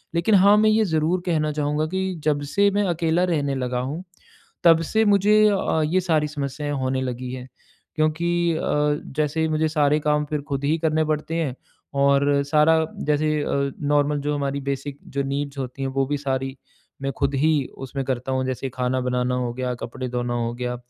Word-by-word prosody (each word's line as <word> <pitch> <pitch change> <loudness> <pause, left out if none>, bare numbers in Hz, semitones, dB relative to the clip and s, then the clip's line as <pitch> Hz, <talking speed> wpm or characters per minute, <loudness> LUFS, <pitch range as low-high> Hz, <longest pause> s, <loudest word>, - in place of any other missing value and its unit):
लेकिन 170 +6 +3
हाँ, 200 +2 +6
मैं 215 +1 +4
ये 215 0 +3
ज़रूर 165 +1 +1
कहना 155 -4 +1
चाहूँगा 150 +1 0
कि 190 +2 -2
जब 150 -2 +1
से 200 0 +5
मैं 205 +1 +1
अकेला 165 +1 +1
रहने 145 -4 0
लगा 125 -1 -2
हूँ, 140 +8 -4 0.6
तब 165 -1 +6
से 220 +7 +1
मुझे 205 0 +4
अ, 190 -5 +1
ये 180 +5 +1
सारी 160 -4 +1
समस्याएँ 145 0 -4
होने 130 0 0
लगी 125 -1 -4
हैं। 130 0 -7 0.5
क्योंकि 170 +2 +1
अ, - - -2 0.6
जैसे 155 +1 +1
मुझे 155 0 +1
सारे 150 -1 +2
काम 150 0 +1
फिर 150 0 -3
खुद 140 0 -2
ही 150 +3 +2
करने 155 0 +2
पड़ते 155 +1 -2
हैं 155 -7 -1 0.5
और 140 0 +3
सारा 155 +2 +4 0.3
जैसे 150 0 +1
अ, 140 -1 -1
नॉर्मल 145 0 +1
जो 145 +1 -1
हमारी 140 0 -2
बेसिक 140 +1 -5 0.2
जो 140 - +2
नीड्स 140 +1 -3
होती 130 0 -5
हैं 135 - -1
वो 135 - +3
भी 145 +1 -1
सारी 135 -1 -3 0.4
मैं 135 0 -1
खुद 140 0 0
ही 155 +4 +3 0.3
उसमें 135 +1 -4
करता 130 0 -2
हूँ। 130 0 0
जैसे 130 +1 -3
खाना 125 +1 -1
बनाना 125 0 0
हो 125 -1 -2
गया, 125 0 -2
कपड़े 130 +2 -6
धोना 120 0 -2
हो 120 -1 -1
गया 125 0 -3
145 Hz, 190 wpm, -23 LUFS, 135-160 Hz, 0.6 s, हाँ